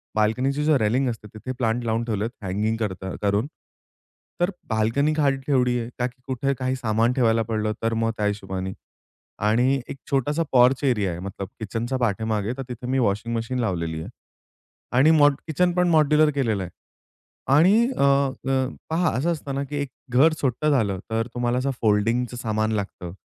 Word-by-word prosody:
बाल्कनीची 125 +7 +1
जी 155 -2 +4
railing 125 +5 +1
असते 110 -2 -6
तिथे 120 +4 -6
plant 120 0 0
लावून 115 +1 0
ठेवलेत 110 0 -1
हँगिंग 105 +4 -1
करता 95 -4 -4
करून. 105 +5 +1 0.9
तर 180 +3 +2 0.2
बाल्कनी 115 +7 +1
घाट 145 -3 +2
ठेवली 125 -3 +2
आहे 115 +1 -5
ताकी 125 +1 -3
कुठे 135 +2 0
काही 130 0 0
सामान 115 -1 +1
ठेवायला 115 -3 +2
पडलं 110 -1 -1
तर 115 0 +1
मग 115 0 +1
त्या 105 - 0
हिशोबाने. 95 -2 -3 0.7
आणि 125 +4 +2
एक - - -6
छोटासा 145 +4 +1
पॉर्च 125 +2 +4
एरिया 105 -8 +2
आहे 85 - -6
मतलब 95 0 -6
किचनच्या 115 +5 -3
पाठीमागे 110 -1 -1
तर 135 - -4
तिथे 125 +1 -6
मी 130 +1 +1
वॉशिंग 115 +1 0
मशीन 125 +3 -2
लावलेली 85 -7 -2
आहे - - -7 0.9
आणि 150 +5 +6
मॉड 145 -2 +6
किचन 175 +3 +2
पण 180 0 +2
मॉड्युलर 155 -1 +4
केलेलं 110 -8 0
आहे 90 - -7 0.9
आणि 205 +10 +5
अ, - - +2
अ, 135 -1 +2 0.2
पहा 165 +1 +2
असं 170 +6 +1
असतं 145 -4 -4
ना, 140 - -1
की 145 +2 -6
एक 140 - -3 0.2
घर 155 +6 +5
छोटं 140 +3 +1
झालं, 105 -9 +1
तर 115 +1 0
तुम्हाला 120 0 0
असं 135 +1 0
फोल्डिंगचं 115 +3 +1
सामान 110 -2 -1
लागतं, 100 -4 -4
120 Hz, 175 wpm, -24 LUFS, 110-135 Hz, 0.9 s, आणि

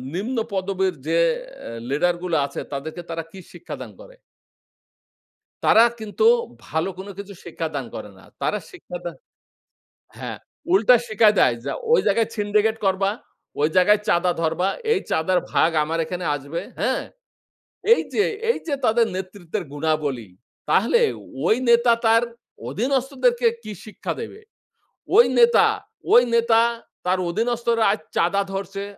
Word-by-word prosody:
নিম্ন 230 +7 -3 0.2
পদবীর 190 -1 0
যে 165 +1 +2 0.2
অ্যা - - -11 0.2
লিডারগুলো 175 +4 0
আছে - - -6
তাদেরকে 155 +5 -5
তারা 165 0 -3
কি 190 - -11
শিক্ষা - - -8
দান - - -8
করে? - - -15 1.5
তারা 225 - +7 0.2
কিন্তু 220 - 0 0.4
ভালো 160 +4 -1
কোন 195 +2 -8
কিছু 200 0 -7
শিক্ষা 165 -1 -4
দান 135 -4 -3
করে - - -7
না। - - -18 0.2
তারা - - 0
শিক্ষা 410 +6 -9
দান - - -5 1.0
হ্যাঁ, - - -6 0.3
উল্টা 250 -10 +6
শিখায় 215 -1 +4
দেয় 125 - +4
যে - - -2 0.2
ওই - - +6
জায়গায় 220 +2 +2
সিন্ডিকেট 210 +1 +1
করবা, 195 +1 +2 0.5
ওই 150 - +3
জায়গায় 210 +3 +5
চাঁদা 175 0 +3
ধরবা, 165 +3 0 0.2
এই 400 - +2
চাঁদার 180 +3 +2
ভাগ 165 - +4
আমার 165 +2 -2
এখানে 180 0 -5
আসবে, 145 +4 -5 0.2
হ্যাঁ? - - 0 0.9
এই - - +1
যে, 415 - +3 0.3
এই 470 - +2
যে 285 - 0
তাদের 230 +1 +3
নেতৃত্বের 185 -2 -5
গুণাবলী, 145 -8 -2 0.4
তাহলে 470 - +3 0.5
ওই 220 - +5
নেতা 235 0 +5
তার 230 +1 +5 0.5
অধীনস্থদেরকে 250 - +1 0.2
কি 215 - -7
শিক্ষা 215 - -5
দেবে? 430 - -8 0.8
ওই 475 - +9
নেতা, 475 0 +6 0.5
ওই 245 - +8
নেতা 230 -1 +4 0.5
তার 185 +1 +2
অধীনস্থরা 235 +2 0
আজ 205 - 0 0.2
চাঁদা 195 +4 +2
ধরছে, 195 0 -4
200 Hz, 140 wpm, -22 LUFS, 170-235 Hz, 1.5 s, ওই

